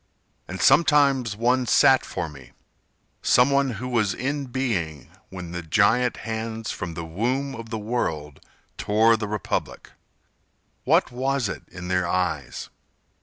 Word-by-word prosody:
And 95 - -6
sometimes 140 -8 +4
one 125 +3 +1
sat 130 +2 +5
for 85 - -4
me— 75 -3 -13 0.7
Some 125 +3 +4
one 140 -2 +2
who 125 +5 -5
was 115 -5 0
in 140 +1 -3
being 105 - -3 0.2
When 90 -2 -8 0.2
giant 115 +6 +3
hands 110 0 -4
from 85 -3 -5
the 85 0 -5
womb 125 +11 -2
of 115 0 -8
the 110 - -3
world 80 - -3 0.4
Tore 110 +2 +4
the 110 -1 -4
republic. 105 0 -4 0.9
What - - +3
was 130 -1 -1
it 95 -6 -6
in 90 0 -8
their 90 -1 0
eyes? 85 -6 -2
110 Hz, 135 wpm, -24 LUFS, 90-125 Hz, 0.9 s, sat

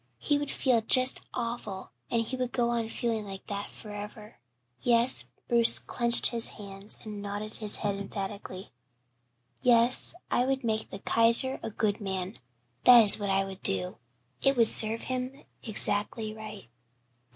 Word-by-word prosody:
He 290 -1 -1
would 290 -1 -5
feel 250 -4 0
just 255 +3 +5
awful 230 -5 -6 0.2
and 230 -1 -1
he 255 - -5
would 250 -1 -4
go 240 -1 -1
on 230 -2 -3
feeling 225 -2 -3
like 195 -1 -10
that 200 0 -6
forever. 210 - -11 0.4
Yes" 240 +1 +4 0.2
Bruce 235 -1 +6
clenched 235 -1 +4
his 230 -1 -1
hands 200 0 -11
and 210 -2 -9
nodded 205 +1 -7
his 210 -2 -3
head 200 -2 -3
emphatically, 195 -1 -8 0.9
"yes, 245 +4 +2 0.2
I 245 - +1
would 270 +1 -2
make 220 -1 -3
the - - -8
Kaiser 230 +5 +2
a - - -6
good 215 0 -3
man 190 0 -5 0.4
that 245 -2 +7
is 210 - +7
what 200 -1 -4
I 195 0 0
would 195 0 -11
do 90 -1 -3 0.4
it 270 -1 +1
would 230 -2 +3
serve 220 +1 +4
him 255 +1 -6 0.2
'zackly 215 0 -2
right." 215 - -11
220 Hz, 155 wpm, -27 LUFS, 205-240 Hz, 0.9 s, that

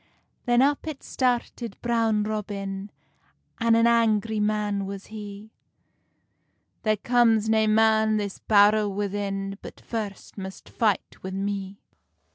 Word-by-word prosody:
Then 240 +1 +5
up 285 +2 +1
it 300 -3 -6
started 245 -2 -1
Brown 225 -3 +2
Robin, 200 -2 -4 0.7
An 230 0 +4
an 230 0 +4
angry 225 -2 +2
man 210 -2 0
was 195 0 -7
he: 210 0 -8 1.3
"There 215 -1 +1
comes 225 -1 +3
nae 220 0 +3
man 220 0 +4
this 200 -2 -4
bowr 210 0 +4
within 195 0 -3
But - - -10
first 210 -3 -6
must 190 0 -8
fight 215 -4 +1 0.2
wi 190 0 -5
me." 200 0 -4
215 Hz, 120 wpm, -25 LUFS, 200-225 Hz, 1.3 s, Then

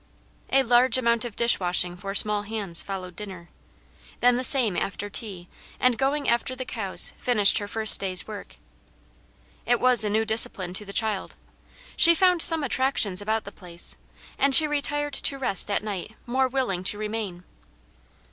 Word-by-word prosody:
A 270 0 +1
large 245 0 +2
amount 235 -1 -1
of 230 -4 -9
dish 235 0 +1
washing 180 -1 -1
for 195 +2 -9
small 210 0 +3
hands 205 -5 -2
followed 185 -3 -9
dinner. 185 -4 -11 0.7
Then 245 0 +2
the 250 - -4
same 245 -8 +1
after 200 +2 -6
tea 190 -6 -5 0.3
and 250 -1 +1
going 280 +3 -3
after 240 +2 -2
the 255 0 -8
cows 205 -6 0
finished 210 -5 +3
her 205 - -8
first 220 +1 +6
day's 185 -3 -2
work. 210 -2 -11 1.1
It 240 -1 -1
was 250 -3 +3
a 210 - -3
new 220 +2 -1
discipline 205 -5 0
to 210 +3 -4
the 200 - -11
child. 215 -2 -4 0.6
She 335 -1 +6
found 360 -1 +1
some 325 -2 +7
attractions 255 -8 -1
about 220 +2 -3
the 200 - -11
place, 175 -4 -3 0.4
and 275 -1 +3
she 315 - +9
retired 290 0 -4
to 275 +1 -2
rest 230 -9 +4
at 205 - -3
night 210 0 -8
more 260 +2 -1
willing 245 -9 -4
to 205 - 0
remain. 210 -4 -7
220 Hz, 170 wpm, -23 LUFS, 195-255 Hz, 1.1 s, she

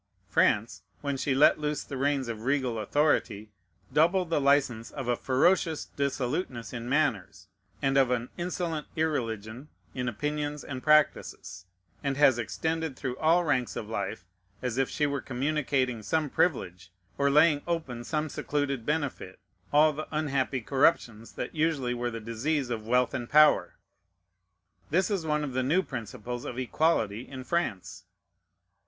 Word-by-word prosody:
France, 105 +1 +2 0.2
when 140 -1 -2
she 135 0 0
let 145 +3 +5
loose 150 0 -2
the 140 - -7
reins 135 -1 0
of 115 -2 -5
regal 130 -2 0
authority, 110 -4 0 0.4
doubled 170 +2 +3
the 155 - +2
license 135 -5 +2
of 135 -4 -6
a 120 - +2
ferocious 160 +6 +2
dissoluteness 135 -2 -2
in 120 0 -5
manners, 105 - -1 0.3
and 135 0 +2
of 130 -2 +4
an 125 -1 -1
insolent 175 -3 -3
irreligion 120 -5 -2 0.3
in 125 -1 -2
opinions 150 +5 -3
and 130 -2 -6
practices, 100 - +1 0.4
and 140 -1 -1
has 135 -4 +5
extended 155 - -2
through 130 -1 -4
all 165 +3 +4
ranks 130 -6 0
of 105 - -5
life, 100 -4 -4 0.4
as 125 0 -1
if 135 - +1
she 150 - 0
were 140 -2 -1
communicating 130 -2 -1
some 155 +5 -1
privilege, 95 - -1 0.3
or 140 0 +3
laying 150 +1 +5
open 145 -9 -3
some 155 +4 -1
secluded 140 -4 -2
benefit, 145 -11 -2 0.3
all 150 +1 +5
the 155 +2 -6
unhappy 140 -4 -1
corruptions 120 -4 +1
that - - -5
usually 150 -6 0
were 120 0 -2
the 115 -1 -5
disease 120 +5 -2
of 110 -2 -4
wealth 125 +1 +2
and 120 -3 -4
power. 150 +1 +5 1.1
This 185 +7 +1
is 180 -6 -1
one 150 0 +1
of 140 -3 -4
the 130 - +1
new 160 +9 +2
principles 120 - -6
of 125 - -6
equality 125 -5 0
in 130 -1 -7
France. 125 - -3
135 Hz, 150 wpm, -28 LUFS, 120-150 Hz, 1.1 s, let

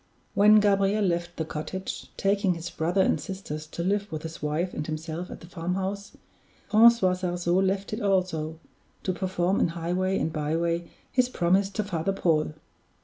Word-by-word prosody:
When 210 +1 +7
Gabriel 200 0 +3
left 175 -1 -1
the 160 - -1
cottage, 175 +5 -5
taking 195 -2 +2
his 165 0 -6
brother 175 +4 +1
and - - +1
sisters 155 -6 -6
to 170 +2 -5
live 205 +2 0
with 155 -1 -4
his 160 0 -7
wife 155 +5 -1
and 150 - -4
himself 160 +3 -4
at - - -9
the - - -10
farmhouse, 190 +3 -4 0.5
Francois 220 -3 +6
Sarzeau 175 -1 0
left 195 +1 0
it 215 - -3
also, 180 -6 0 0.5
to 185 - 0
perform 185 0 0
in - - +3
highway 175 +3 -1
and 160 - -1
byway 165 +3 -1 0.2
his 250 -1 +2
promise 190 -1 +2
to 215 +1 -2
Father 190 -1 -1
Paul. 155 -5 +1
180 Hz, 165 wpm, -27 LUFS, 165-195 Hz, 0.5 s, When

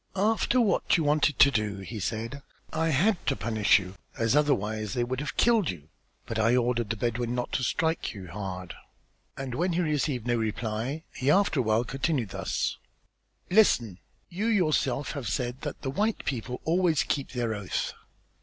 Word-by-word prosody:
"After 220 +5 +2
what 210 -6 +3
you 165 - 0
wanted 150 0 +2
to 140 -1 +7
do," 105 -4 -1
he 100 +3 -7
said, 115 +8 -3 0.3
"I 160 +1 +1
had 175 +7 +2
to 135 - +2
punish 110 -2 +3
you 95 -2 -5 0.2
as 115 +3 +2
otherwise 110 -8 +1
they 120 - +1
would 130 +1 -2
have 150 +1 -5
killed 230 -6 +4
you, 80 -4 -7 0.4
but 115 - -3
I 115 +2 +4
ordered 120 -3 +1
the 115 - 0
Bedouin 120 +2 -1
not 125 - -3
to 130 - -1
strike 160 +5 0
you 95 -2 -8
hard." 90 -1 -6 0.6
And 135 -2 -4
when 175 +7 0
he 175 - +1
received 150 -6 0
no 120 -1 +1
reply, 115 +6 -2
he, 130 - -1
after 185 -3 +3
a - - +3
while, 110 +1 +2
continued 135 - -1
thus: - - -2 0.7
"Listen! 120 - +4 0.3
you 195 +6 -2
yourself 155 - +1
have 140 -6 -5
said 125 0 -2
that 145 - -6
the 135 - -2
white 210 +9 -1
people 125 -1 -3
always 165 -4 +2
keep 140 -1 -2
their 120 -3 -1
oath. 100 -3 -3
125 Hz, 180 wpm, -28 LUFS, 110-155 Hz, 0.7 s, to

